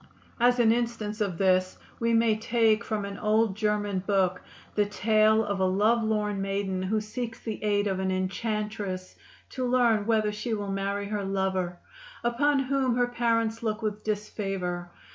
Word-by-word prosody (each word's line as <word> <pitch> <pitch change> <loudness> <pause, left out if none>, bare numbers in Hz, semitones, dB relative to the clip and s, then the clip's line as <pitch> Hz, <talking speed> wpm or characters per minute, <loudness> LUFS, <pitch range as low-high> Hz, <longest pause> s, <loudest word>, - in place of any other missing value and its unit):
As 245 +1 +4
an 230 -2 +5
instance 230 -2 -2
of 190 -5 -1
this 185 -1 +2 0.2
we 230 0 +1
may 225 -1 +4
take 225 0 +2
from 215 -3 -2
an 200 -1 -7
old 215 -1 +2
German 205 -2 0
book 185 -2 +1 0.3
the 210 -1 +2
tale 215 +1 +3
of 200 -1 -2
a 190 - +3
lovelorn 210 +1 +1
maiden 195 -1 -2
who 205 +4 0
seeks 225 +2 -5
the 220 -2 -5
aid 205 -1 +2
of 190 -2 -1
an 190 0 0
enchantress 195 0 -3 0.4
to 260 - -3
learn 240 -4 +2
whether 215 -2 +2
she 215 +2 -3
will 205 -2 -4
marry 200 +1 -2
her 210 -1 -2
lover, 190 -2 -1 0.5
upon 275 +5 +2
whom 270 -2 +1
her 245 0 +2
parents 230 -2 0
look 220 -1 -2
with 215 -1 -3
disfavor. 195 -4 -3
210 Hz, 160 wpm, -27 LUFS, 195-230 Hz, 0.5 s, an